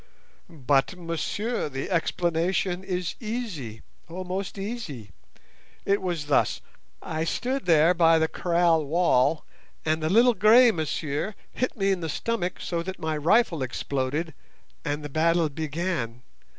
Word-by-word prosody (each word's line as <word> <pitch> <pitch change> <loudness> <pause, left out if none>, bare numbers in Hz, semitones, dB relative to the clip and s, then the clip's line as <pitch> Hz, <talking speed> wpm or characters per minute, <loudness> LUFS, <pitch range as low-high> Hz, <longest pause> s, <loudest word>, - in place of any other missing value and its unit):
"But, 140 0 +1
monsieur, 175 +5 -2
the 135 +7 -5
explanation 175 +2 0
is 180 -2 -2
easy; 205 - -5 0.3
oh, 180 +3 -5
most 190 +2 -4
easy! 195 - -6 0.7
it 200 +1 +2
was 175 -5 -2
thus: 145 -2 +2 0.4
I 160 0 -2
stood 250 - -2
there 165 +1 +5
by 165 -2 +5
the 160 0 +2
kraal 170 -2 +2
wall, 155 -2 +2 0.4
and 160 0 +1
the 155 - 0
little 235 +6 +5
grey 225 +4 +6
monsieur 155 +2 -3 0.2
hit 255 0 -2
me 195 -1 +2
in 190 - 0
the 165 -2 -4
stomach 185 -1 -2
so 170 -1 -2
that 190 +2 -6
my 160 -1 -2
rifle 170 - +2
exploded, 140 +5 -2 0.5
and 150 0 -3
the - - -4
battle 160 +2 +2
began. 150 -5 -3
170 Hz, 135 wpm, -26 LUFS, 150-190 Hz, 0.7 s, grey